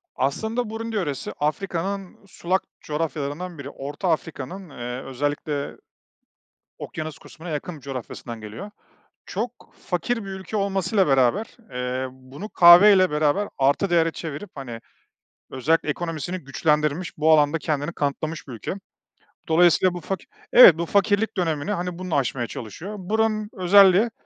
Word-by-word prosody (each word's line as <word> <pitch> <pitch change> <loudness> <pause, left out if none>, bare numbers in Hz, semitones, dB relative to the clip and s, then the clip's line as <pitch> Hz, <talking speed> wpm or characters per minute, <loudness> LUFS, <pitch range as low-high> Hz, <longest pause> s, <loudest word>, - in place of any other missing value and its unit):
Aslında 220 - -1
Burundi 225 +1 -5
yöresi 150 -9 -2
Afrika'nın 190 +5 -3
sulak 185 +1 -1 0.2
coğrafyalarından 155 +2 -4
biri. 140 -1 -7
Orta 145 +7 -4
Afrika'nın, 165 +3 -4
eee, 125 -1 -6
özellikle 145 +2 -3 1.0
okyanus 155 -1 -6
kısmına 170 +2 -11
yakın 155 +2 -4
bir - - -16
coğrafyasından 125 -3 -7
geliyor. 110 - -8 0.5
Çok 240 - -3 0.3
fakir 180 +7 -1
bir - - -7
ülke 190 +2 -5
olmasıyla 195 0 +1
beraber, 135 - +2
eee, 125 +1 -2
bunu 130 +10 -10
kahve 175 +4 +8
ile 185 -3 +4
beraber 150 +7 +1
artı 140 +8 +2
değere 165 -1 +3
çevirip, 160 +5 -7
hani, 125 -5 -7 0.7
özellikle 155 +5 +1
ekonomisini 165 +2 -3
güçlendirilmiş, 150 +2 -1
bu 155 +1 +3
alanda 150 0 +4
kendini 150 0 -2
kanıtlamış 155 +2 -3
bir 130 - -8
ülke. 115 - -5 0.8
Dolayısıyla, 175 +2 +4
bu 175 - -5
faki 190 +4 -5 0.3
evet, 185 -10 +9
bu 170 - -1
fakirlik 205 +3 +1
dönemini, 160 -3 -1
hani, 180 -2 -3
bununla 185 -3 -2
aşmaya 125 -2 -1
çalışıyor. 155 - -7
Buranın 215 +2 0
özelliği, 195 +3 +5
165 Hz, 135 wpm, -24 LUFS, 145-190 Hz, 1.0 s, evet